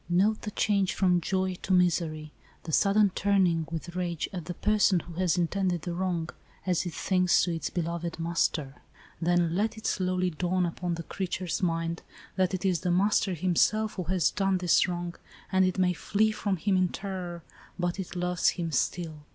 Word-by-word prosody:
Note 200 +5 +2
the 210 - -4
change 200 -2 +1
from 180 -2 +3
joy 185 +2 0
to - - -4
misery, 165 -4 +1 0.3
the 165 - -5
sudden 200 +4 +4
turning 180 -5 +2
with 170 +1 -5
rage 175 -3 -2
at 175 -4 -5
the 175 +1 -5
person 205 -3 +3
who 170 - -11
has 180 0 +1
intended 180 0 0
the 175 - -3
wrong, 175 -2 -1 0.4
as 180 -1 0
it 170 - -5
thinks 180 -2 +3
to 175 - 0
its 165 - -3
beloved 170 -1 -3
master. 165 -4 -1 0.4
Then 170 -1 +2
let 215 +3 0
it 220 - -10
slowly 185 -1 0
dawn 180 +2 0
upon 175 0 -3
the 165 - -6
crea 190 +3 -4
ture's 175 -1 -3
mind, 165 -1 -1 0.3
that 185 0 +1
it 185 - -5
is 180 -3 +2
the 180 - -2
master 190 +1 +2
himself, 190 +5 +2
who 185 - -4
has 180 -1 +2
done 195 -1 +1
this 180 0 +3
wrong, 175 -1 -3 0.4
and 190 0 +4
it 185 0 -1
may 180 -1 +3
flee 215 +5 +1
from 205 -2 -1
him 195 +4 +1
in 185 0 +3
terror, 180 -3 -5 0.3
but 175 +1 -2
it 190 0 -5
loves 180 0 +1
him 170 -2 -2
still. 155 +1 -2
180 Hz, 190 wpm, -28 LUFS, 170-190 Hz, 0.4 s, sudden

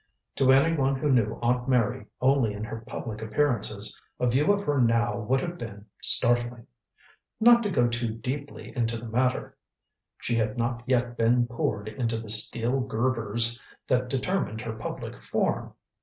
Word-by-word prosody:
To 130 -1 +5
any 140 +5 +4
one 135 -2 +1
who 145 +2 0
knew 115 -4 +2
Aunt 125 +2 +1
Mary 115 -4 +1
only 130 -4 +3
in 105 +1 -6
her 115 0 -5
public 110 -3 -6
appearances, 110 -3 0 0.2
a - - +1
view 135 +9 +3
of 200 0 0
her 145 -5 +1
now 115 0 +2
would 125 +4 0
have 175 0 -5
been 105 -3 -8 0.2
startling. 120 -1 +3 0.7
Not 235 +1 +7
to 210 - -1
go 125 -10 +2
too 120 0 -1
deeply 140 +7 -6
into 115 -2 0
the 115 - -8
matter, 125 +3 0 0.6
she 120 - -2
had 110 0 -1
not 120 0 -1
yet 120 -2 0
been 120 +2 +3
poured 110 -3 -2
into 115 +1 -2
the 110 -1 -8
steel 115 +4 0
girders 115 -2 0 0.3
that 125 -1 +1
determined 135 - -1
her 115 -2 -4
public 110 - -7
form. - - -1
120 Hz, 165 wpm, -27 LUFS, 115-130 Hz, 0.7 s, Not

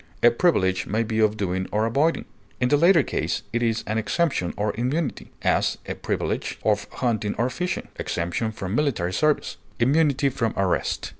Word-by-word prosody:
A 120 - +8
privilege 95 - +2
may 110 +3 0
be 110 0 -2
of 110 -1 +3
doing 95 -2 -1
or 105 +1 +1
avoiding; 140 +9 +1 0.3
in 125 0 +2
the 145 - +5
latter 170 0 +5
case 105 - -2
it 120 - 0
is 115 -1 0
an 110 +1 -1
exemption 110 - 0
or 105 0 0
immunity; 130 +5 -2
as, - - +2
a - - -2
privilege - - -3
of - - +1
hunting 110 -4 -1
or 125 +2 0
fishing; 180 +8 -3
exemption 90 +6 -2
from 95 -3 -5
military 115 -11 0
service; 150 +5 +1 0.2
immunity 140 +2 +3
from 115 -4 -2
arrest. 95 -2 0
115 Hz, 170 wpm, -24 LUFS, 105-140 Hz, 0.3 s, A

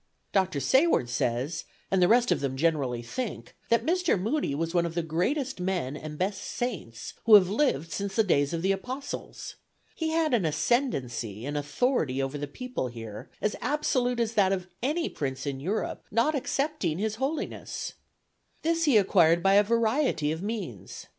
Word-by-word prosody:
Dr. 190 -6 +2
Sayward 260 - +3
says, 125 +7 -1 0.3
and 190 -1 +3
the 180 - +6
rest 240 +4 +4
of - - +3
them 135 -1 -2
generally 135 -6 0
think, 240 - -5
that 230 0 +3
Mr. 355 - +2
Moody 220 - 0
was 165 +3 -2
one 170 -1 +2
of 165 - -7
the 170 - 0
greatest 245 - -1
men 180 -7 -1
and 150 0 -7
best 195 +3 -1
saints 175 - -4
who 225 -2 +9
have 185 -3 +7
lived 195 - +1
since 200 +3 -3
the 220 - +4
days 145 -7 +2
of 165 0 -3
the 190 - +3
Apostles. 250 +8 -5 0.4
He 320 -1 -2
had 320 -3 +1
an 225 -6 +3
ascendency 130 - -1
and 145 +1 -3
authority 145 - 0
over 135 +2 -2
the 145 - -3
people 250 - -4
here, 115 0 -8
as 210 - 0
absolute 250 -3 0
as 230 -1 0
that 195 -4 +3
of 185 -2 -1 0.2
any 305 +7 0
prince 135 -2 -4
in 140 -2 -3
Europe, 190 +10 -2
not 230 +8 +2
excepting 275 - -1
his 215 +2 -2
Holiness. 275 +5 -3 0.7
"This 330 +1 +2
he 275 -7 +5
acquired 175 -4 +4
by 195 - +5
a 205 +1 +7
variety 230 - +1
of 160 +2 -3
means. 195 - -5
190 Hz, 175 wpm, -28 LUFS, 145-245 Hz, 0.7 s, who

